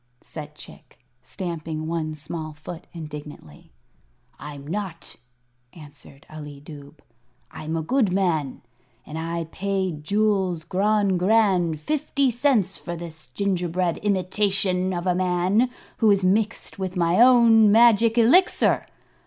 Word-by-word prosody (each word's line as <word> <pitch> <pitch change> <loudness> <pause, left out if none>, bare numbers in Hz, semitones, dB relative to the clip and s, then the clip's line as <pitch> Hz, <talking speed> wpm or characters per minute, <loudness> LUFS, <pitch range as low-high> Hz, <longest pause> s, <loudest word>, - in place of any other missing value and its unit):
said 150 -1 -10
Chick, - - -14 0.2
stamping 160 -1 -5
one 160 -1 -3
small 155 +1 -6
foot 160 +3 -10
indignantly. 150 - -10 0.7
"I'm 145 -1 -9
not," 180 0 -5 0.6
answered 145 -3 -14
Ali 150 -2 -10
Dubh; 145 0 -13 0.5
"I'm 160 +1 -5
a 160 - -2
good 235 - +1
man. 170 -8 -1 0.4
And 155 +1 -7
I 165 +1 -3
paid 190 -5 -3
Jules 195 -3 0
Grogrande 190 -2 +1
fifty 280 - 0
cents 240 -7 +1
for 170 - -6
this 165 -3 -9
gingerbread 180 +2 -1
imitation 190 -1 +1
of 175 -1 -4
a 180 - +2
man, 185 +6 +1 0.3
who 220 - +3
is 200 -2 +3
mixed 210 +2 -1
with 185 -1 -4
my 170 +2 +2
own 230 -4 +6
magic 230 0 +5
Elixir. 270 +12 +3
180 Hz, 120 wpm, -23 LUFS, 155-205 Hz, 0.7 s, own